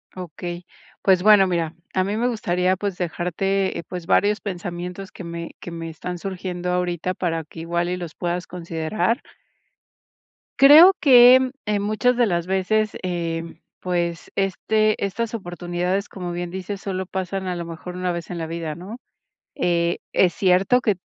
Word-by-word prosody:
Okey, 175 0 -7 0.4
pues, 185 -1 +3
bueno, 205 -3 +7
mira, 170 -2 -1 0.2
a 185 - +3
mí 200 +3 -2
me 240 +2 +1
gustaría, 185 -5 0
pues, 195 -1 -3
dejarte, 185 +3 -1
eh, - - -6
pues 180 -2 -6
varios 205 +5 +2
pensamientos 180 0 -6
que 185 - -10
me 170 0 -7
que 175 - -8
me 165 0 -6
están 175 +2 -6
surgiendo 180 -2 -4
ahorita 180 0 -1
para 165 -3 -2
que 160 +2 -11
igual 170 +1 -1
y 180 - -2
los 170 -3 -7
puedas 175 0 -3
considerar. 175 - -2 1.4
Creo 310 +7 +9
que 255 -1 +8 0.2
en 210 -1 0
muchas 215 +4 +1
de 240 -1 +3
las 170 -3 0
veces, 200 +3 +1
eh, 170 -2 -2 0.4
pues, 175 -2 -2
este 215 +3 +1
estas 220 +4 -2
oportunidades, 180 0 -2
como 180 -2 -6
bien 175 0 -4
dices, 190 +2 -5
solo 190 -2 -4
pasan 190 0 -3
a 180 - -2
lo 170 -1 -5
mejor 170 +2 -8
una 180 0 -1
vez 170 -1 -5
en 175 - -5
la 165 - -3
vida, 165 -2 -4
¿no?, 195 +8 -8 0.6
eh, 170 -4 +1 0.2
es 180 -2 +4
cierto 195 +6 +3
que 210 -4 +2
180 Hz, 165 wpm, -22 LUFS, 175-200 Hz, 1.4 s, Creo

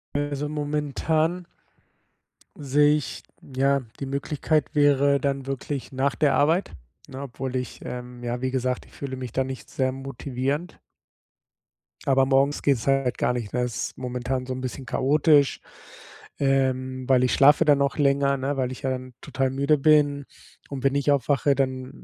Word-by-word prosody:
Also 145 0 -2
momentan 150 +3 -1 1.1
sehe 145 +1 +3
ich 150 - -6 0.2
ja, 135 +1 +1 0.2
die 140 - -3
Möglichkeit 145 +2 0
wäre 140 -1 +4
dann 135 -1 -2
wirklich 135 0 -4
nach 135 +1 0
der 145 -3 +2
Arbeit, 165 +6 +2 0.4
ne? 135 0 -7
Obwohl 130 0 -5
ich, 125 -1 -4
ähm 125 0 -7
ja, 120 +1 -3
wie 130 0 -1
gesagt, 130 -1 -1
ich - - -21
fühle 135 -2 -6
mich 125 -3 -6
da 130 - 0
nicht 130 0 -7
sehr 130 -1 0
motivierend. 135 +4 -4 1.3
Aber 135 -1 +4
morgens 135 +2 +2
geht's 135 -3 +1
halt 135 -2 +1
gar - - +1
nicht, 120 -4 -5
ne? 125 - 0
Es 125 -3 -3
momentan 125 0 -3
so 130 - -4
'n 130 - -5
bisschen 130 +1 -5
chaotisch, 145 +2 +3 0.8
ähm 130 -1 0
weil 130 -1 +4
ich 125 - +2
schlafe 145 +2 +6
dann 145 -2 +4
auch 140 - 0
länger, 140 -1 +2
ne, 135 +2 -2
weil 130 -1 -1
ich 130 - -8
ja 135 - -1
dann 130 -1 -5
total 135 -1 -1
müde 140 +3 +2
bin 145 -1 +3 0.4
und 135 -2 -6
wenn 135 0 +2
ich 140 +1 +2
aufwache, 140 0 +2
dann 130 0 -3
135 Hz, 165 wpm, -25 LUFS, 130-145 Hz, 1.3 s, schlafe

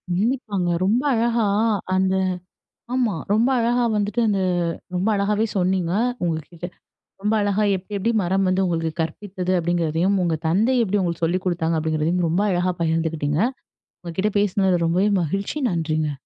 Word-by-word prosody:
நின்னிப்பாங்க, 205 -4 -1 0.2
ரொம்ப 225 +6 +2
அழகா. 230 -1 +1 0.5
அந்த 190 0 +2 0.8
ஆமா 240 -6 +1 0.2
ரொம்ப 225 +4 +3
அழகா 240 +1 +2
வந்துட்டு, 210 +3 0
அந்த 200 -2 +1 0.5
ரொம்ப 185 +4 0
அழகாவே 210 +2 +1
சொன்னீங்க. 180 -2 +1 0.3
உங்ககிட்ட 165 +1 -4 0.6
ரொம்ப 210 +1 +1
அழகா 205 +1 +1
எப்டி, 190 +3 -9
எப்டி 225 +4 0
மரம் 190 +2 +1
வந்து 185 +1 +2
உங்களுக்கு 165 -3 -1
கற்பித்தது? 185 +3 -4
அப்டீங்கறதையும், 175 +3 +1
உங்க 165 -2 +1
தந்தை 220 +10 +2
எப்டி 205 -1 0
உங்களுக்கு 170 -2 -1
சொல்லிக்குடுத்தாங்க? 170 -2 0
அப்டீங்கறதையும் 160 +3 0
ரொம்ப 175 +5 +1
அழகா 180 0 +1
பகிர்ந்துக்கிட்டீங்க. 160 -2 0 0.6
உங்ககிட்ட 185 +5 -1
பேசுனதுல 190 -3 +2
ரொம்பவே 185 +5 +2
மகிழ்ச்சி 195 - -2
நன்றிங்க. 155 -2 -1
185 Hz, 135 wpm, -22 LUFS, 165-205 Hz, 0.8 s, ரொம்ப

